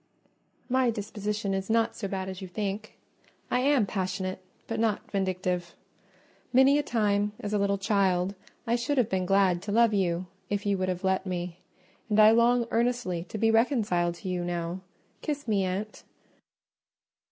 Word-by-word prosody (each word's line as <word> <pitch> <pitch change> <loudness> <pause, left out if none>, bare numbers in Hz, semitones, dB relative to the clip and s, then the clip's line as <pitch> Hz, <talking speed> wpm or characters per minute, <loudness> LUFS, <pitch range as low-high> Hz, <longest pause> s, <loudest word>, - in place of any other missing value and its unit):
"My 260 -1 +2
disposition 210 -2 -3
is 195 +1 -3
not 225 0 +2
so 200 - -4
bad 190 -1 -3
as 190 0 -6
you 190 - -6
think: 205 +3 -4 0.5
I 250 - +3
am 270 -3 +3
passionate, 185 -1 -3 0.2
but 225 -1 -3
not 220 -2 -1
vindictive. 185 -3 -2 0.8
Many 265 +3 +5
a - - +3
time, 210 -5 +1
as 205 0 -4
a 210 - +2
little 200 0 +1
child, 195 -2 +1 0.3
I 235 - +1
should 275 +4 -1
have 240 -4 +3
been 185 -1 -1
glad 195 -2 +3
to 205 - -5
love 230 +1 +4
you 180 -3 0 0.2
if 205 0 -2
you 200 -1 +2
would 185 0 0
have 180 0 -3
let 190 0 +1
me; 180 -1 -4 0.5
and 210 0 +2
I 215 0 +8
long 235 +1 +4
earnestly 235 -8 0
to 215 - -6
be 225 +1 +3
reconciled 215 -8 +2
to 180 - -9
you 180 -1 -1
now: 175 +1 -3 0.4
kiss 290 -3 -3
me, 200 -3 +2
aunt." 195 +4 -4
200 Hz, 170 wpm, -28 LUFS, 185-225 Hz, 0.8 s, I